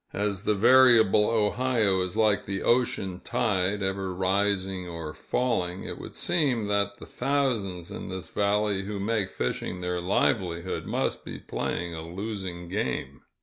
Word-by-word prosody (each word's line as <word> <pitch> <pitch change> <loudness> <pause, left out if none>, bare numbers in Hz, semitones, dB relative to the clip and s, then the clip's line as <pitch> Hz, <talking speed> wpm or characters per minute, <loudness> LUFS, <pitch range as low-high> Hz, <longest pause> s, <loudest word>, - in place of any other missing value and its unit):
As 100 -1 -2
the 105 - +2
variable 115 -2 +6
Ohio 110 -2 +2
is 90 -1 -3
like 110 -2 +2
the 95 -1 -2
ocean 100 -7 +1
tide, 100 -3 0
ever 95 -1 -2
rising 95 -1 0
or 80 -2 -6
falling, 95 -7 -1
it - - -6
would - - -9
seem 140 -10 +1
that 100 0 0
the - - -10
thousands 115 -11 -1
in - - -6
this 95 -1 -6
valley 105 -1 +1
who 100 0 -4
make 105 -1 0
fishing 90 +5 -3
their 90 0 -2
livelihood 90 -1 0
must - - -1
be - - -7
playing 85 -1 -3
a 80 - -5
losing 90 0 -5
game. 70 -7 -3
100 Hz, 150 wpm, -27 LUFS, 90-105 Hz, -, variable